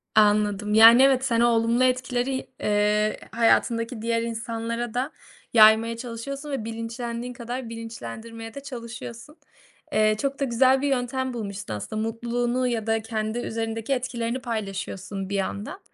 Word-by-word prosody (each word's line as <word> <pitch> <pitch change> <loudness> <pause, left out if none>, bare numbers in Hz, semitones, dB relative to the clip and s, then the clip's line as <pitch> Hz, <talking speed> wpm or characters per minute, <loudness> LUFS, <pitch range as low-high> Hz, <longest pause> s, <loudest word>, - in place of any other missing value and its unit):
Anladım. 210 -1 +3
Yani, 230 +3 +9
evet, 265 -1 +4
sen 235 -3 +1
o 240 - +5
olumlu 230 +2 +2
etkileri, 255 +1 0 0.2
ııı, 210 +1 +2 0.2
hayatındaki 230 0 +2
diğer 230 0 0
insanlara 230 0 -3
da 260 +5 -1 0.4
yaymaya 225 +1 +6
çalışıyorsun 270 +5 -6
ve 265 -6 -3
bilinçlendiğin 235 +2 -5
kadar 240 0 -5
bilinçlendirmeye 225 - -8
de 280 - -6
çalışıyorsun. 235 +1 -8 0.6
Eee, 215 0 +3
çok 275 0 -2
da 280 - 0
güzel 260 +2 +3
bir 285 - 0
yöntem 260 0 -1
bulmuşsun 200 - -5
aslında, 215 - -4
mutluluğunu 240 +2 -1
ya 225 -2 -2
da 225 0 +1
kendi 220 +1 -3
üzerindeki 225 +2 -2
etkilerini 245 -1 -2
paylaşıyorsun 195 -3 -4
bir 200 - -2
yandan. 200 - -3
230 Hz, 140 wpm, -25 LUFS, 220-245 Hz, 0.6 s, Yani